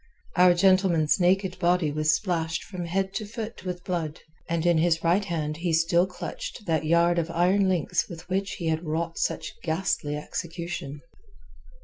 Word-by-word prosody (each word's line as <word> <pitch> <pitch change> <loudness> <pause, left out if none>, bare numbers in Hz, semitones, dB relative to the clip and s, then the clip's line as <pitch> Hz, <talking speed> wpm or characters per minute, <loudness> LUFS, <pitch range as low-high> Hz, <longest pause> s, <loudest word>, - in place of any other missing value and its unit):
Our 180 -1 +6
gentleman's 185 -3 +3
naked 185 +1 +2
body 175 -3 +2
was 155 +2 +2
splashed 170 -4 -2
from 180 -3 -6
head 190 +3 -1
to 215 - -3
foot 225 -1 -7
with 180 -1 -5
blood, 165 -5 -3 0.3
and 170 0 0
in 170 -2 +4
his 165 0 +2
right 175 +5 +3
hand 155 -5 -3
he 170 +1 -1
still 170 +3 +3
clutched 185 +3 -7
that 160 -3 0
yard 170 +2 +3
of 165 0 -2
iron 185 +3 +3
links 180 -1 0
with 165 0 -9
which 195 +2 -1
he 175 - -6
had 160 +1 -1
wrought 165 +1 -2
such - - -2
ghastly 160 -4 -1
execution. 165 -2 -5
175 Hz, 165 wpm, -26 LUFS, 160-185 Hz, 0.3 s, Our